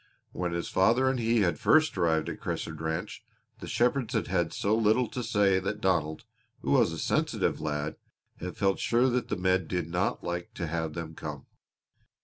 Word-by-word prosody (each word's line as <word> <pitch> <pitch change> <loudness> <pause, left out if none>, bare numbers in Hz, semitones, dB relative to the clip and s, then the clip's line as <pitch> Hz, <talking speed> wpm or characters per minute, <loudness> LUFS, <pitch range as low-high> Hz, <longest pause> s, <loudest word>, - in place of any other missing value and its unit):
When 90 -1 -2
his 85 0 -2
father 115 +8 +3
and 130 - -2
he 115 -1 +2
had 85 -6 +1
first 155 0 +4
arrived 80 -4 +1
at - - -5
Crescent - - -4
Ranch 80 0 -3 0.4
the - - -8
shepherds 125 0 +1
had - - +1
had 85 -3 +1
so 105 +2 +1
little 115 +2 +3
to 125 - -4
say 105 -4 +3
that 100 +3 -3
Donald, 85 -6 0 0.4
who - - -2
was - - +4
a - - -5
sensitive - - 0
lad, 75 0 -2 0.4
had 90 0 -6
felt 95 -1 +1
sure 120 +3 +3
that 125 -1 0
the - - -2
men 95 -1 +1
did 90 -3 -2
not 90 +2 -1
like 85 0 -4
to 90 - -3
have 80 -1 -2
them 80 -1 -5
come. 75 -3 -7
95 Hz, 190 wpm, -29 LUFS, 80-115 Hz, 0.4 s, first